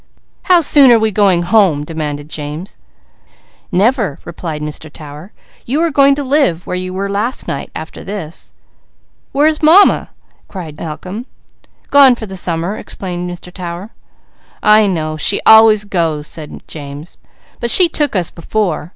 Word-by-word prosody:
"How 360 Hz, -2 st, +5 dB
soon 285 Hz, -4 st, +6 dB
are 235 Hz, -, +6 dB
we 220 Hz, -1 st, 0 dB
going 190 Hz, -4 st, +2 dB
home?" 175 Hz, -6 st, +3 dB
demanded 150 Hz, -2 st, -5 dB
James. 150 Hz, +5 st, -7 dB, 0.9 s
"Never!" 205 Hz, -, +1 dB
replied 160 Hz, -2 st, -6 dB
Mr. 150 Hz, 0 st, -7 dB
Tower. 150 Hz, +5 st, -11 dB, 0.4 s
"You 275 Hz, +6 st, 0 dB
are 335 Hz, -, 0 dB
going 275 Hz, 0 st, +4 dB
to 285 Hz, -, -3 dB
live 265 Hz, -, +1 dB
where -, -, -4 dB
you 185 Hz, 0 st, -4 dB
were 195 Hz, +2 st, -3 dB
last 210 Hz, +6 st, -2 dB
night, 140 Hz, -, -4 dB
after 160 Hz, -, -8 dB
this." 170 Hz, -, -6 dB, 0.8 s
"Where 285 Hz, +2 st, +2 dB
is 310 Hz, 0 st, +1 dB
Mamma?" 335 Hz, +6 st, +5 dB, 0.4 s
cried 165 Hz, -6 st, -8 dB
Malcolm. 185 Hz, -, -7 dB, 0.6 s
"Gone 275 Hz, -3 st, +7 dB
for 230 Hz, -, -7 dB
the 190 Hz, -2 st, -9 dB
summer," 175 Hz, +2 st, -2 dB
explained 180 Hz, -2 st, -6 dB
Mr. 175 Hz, 0 st, -10 dB
Tower. 180 Hz, +3 st, -7 dB, 0.7 s
"I 215 Hz, 0 st, +5 dB
know. 155 Hz, -4 st, -2 dB
She 200 Hz, +6 st, +1 dB
always 220 Hz, -1 st, +7 dB
goes," 165 Hz, -7 st, -2 dB
said 150 Hz, -1 st, -8 dB
James. 145 Hz, +1 st, -9 dB, 0.4 s
"But 235 Hz, -, -2 dB
she 355 Hz, +9 st, +7 dB
took 295 Hz, -6 st, -2 dB
us 180 Hz, -3 st, 0 dB
before. 175 Hz, -2 st, -3 dB
185 Hz, 150 wpm, -15 LUFS, 160-225 Hz, 0.9 s, Gone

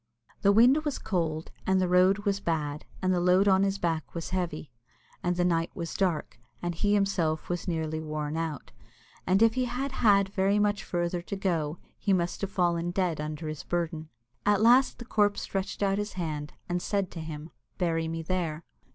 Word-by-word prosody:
The 200 Hz, -, +5 dB
wind 250 Hz, +8 st, +5 dB
was 295 Hz, -3 st, -2 dB
cold, 165 Hz, -4 st, -2 dB, 0.2 s
and 190 Hz, 0 st, +3 dB
the 185 Hz, -, +2 dB
road 185 Hz, +3 st, +4 dB
was 200 Hz, -1 st, +1 dB
bad, 155 Hz, -5 st, -2 dB, 0.2 s
and 185 Hz, 0 st, +3 dB
the 180 Hz, -, +2 dB
load 180 Hz, +2 st, +4 dB
upon 190 Hz, -1 st, +5 dB
his 195 Hz, 0 st, +1 dB
back 165 Hz, -4 st, -2 dB
was 165 Hz, +1 st, -4 dB
heavy, 170 Hz, -6 st, -3 dB, 0.5 s
and 175 Hz, 0 st, 0 dB
the 175 Hz, 0 st, +1 dB
night 165 Hz, -1 st, +1 dB
was 170 Hz, -4 st, -4 dB
dark, 175 Hz, -10 st, -1 dB, 0.2 s
and 175 Hz, 0 st, -2 dB
he 205 Hz, +5 st, +1 dB
himself 175 Hz, -6 st, 0 dB
was 175 Hz, 0 st, -3 dB
nearly 160 Hz, -2 st, -1 dB
worn 155 Hz, -1 st, -3 dB
out, 160 Hz, -3 st, -4 dB, 0.6 s
and 190 Hz, +4 st, +4 dB
if 225 Hz, -1 st, +5 dB
he 255 Hz, +1 st, 0 dB
had 255 Hz, +3 st, -3 dB
had 200 Hz, -6 st, +4 dB
very 195 Hz, +1 st, +2 dB
much 205 Hz, 0 st, +1 dB
farther 175 Hz, 0 st, -1 dB
to 190 Hz, -, -5 dB
go 170 Hz, -5 st, -1 dB, 0.2 s
he 200 Hz, -, +1 dB
must 175 Hz, -1 st, 0 dB
have 200 Hz, -, -1 dB
fallen 175 Hz, -2 st, +1 dB
dead 175 Hz, -4 st, 0 dB
under 155 Hz, +1 st, -5 dB
his 155 Hz, -1 st, -5 dB
burden. 160 Hz, -2 st, -2 dB, 0.3 s
At 205 Hz, 0 st, +3 dB
last 250 Hz, +3 st, +5 dB
the 240 Hz, -, -9 dB
corpse 205 Hz, -3 st, +1 dB
stretched 195 Hz, +1 st, -3 dB
out 195 Hz, 0 st, +2 dB
its 205 Hz, 0 st, -3 dB
hand, 155 Hz, -5 st, -4 dB
and 175 Hz, 0 st, -1 dB
said 200 Hz, -2 st, -1 dB
to 170 Hz, -, -7 dB
him, 155 Hz, 0 st, -7 dB, 0.3 s
"Bury 165 Hz, -2 st, 0 dB
me 165 Hz, 0 st, -4 dB
there." 170 Hz, -2 st, -2 dB
180 Hz, 195 wpm, -28 LUFS, 165-200 Hz, 0.6 s, The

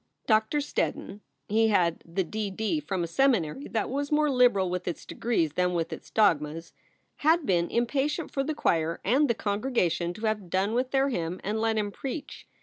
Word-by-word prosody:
Doctor 220 Hz, +5 st, +2 dB
Steddon 210 Hz, -6 st, -3 dB, 0.3 s
he 225 Hz, +2 st, +3 dB
had 175 Hz, -6 st, +2 dB
the 175 Hz, +3 st, -2 dB
D.D. 215 Hz, -, -2 dB
from 190 Hz, -11 st, -3 dB
a -, -, -2 dB
seminary 235 Hz, -, +1 dB
that 220 Hz, -3 st, -1 dB
was 285 Hz, +3 st, -3 dB
more 300 Hz, -1 st, +3 dB
liberal 245 Hz, -7 st, +4 dB
with 180 Hz, 0 st, -3 dB
its 175 Hz, -, -4 dB
degrees 170 Hz, -11 st, -1 dB
than 180 Hz, +1 st, +1 dB
with 165 Hz, -1 st, -1 dB
its -, -, -10 dB
dogmas 165 Hz, -5 st, +1 dB, 0.4 s
had 320 Hz, +1 st, +3 dB
been 175 Hz, -3 st, +1 dB
impatient 275 Hz, +7 st, -1 dB
for 275 Hz, -, -1 dB
the 305 Hz, +2 st, -3 dB
choir 165 Hz, -, 0 dB
and 275 Hz, +8 st, +3 dB
the 235 Hz, -, +2 dB
congregation 200 Hz, -6 st, 0 dB
to 215 Hz, -, -5 dB
have 210 Hz, -4 st, -1 dB
done 190 Hz, +4 st, 0 dB
with 255 Hz, +2 st, 0 dB
their 270 Hz, +1 st, +2 dB
hymn 175 Hz, -6 st, -3 dB
and 215 Hz, +2 st, -1 dB
let 225 Hz, -1 st, +1 dB
him 205 Hz, -1 st, -1 dB
preach. 280 Hz, +6 st, -7 dB
215 Hz, 185 wpm, -27 LUFS, 180-265 Hz, 0.4 s, liberal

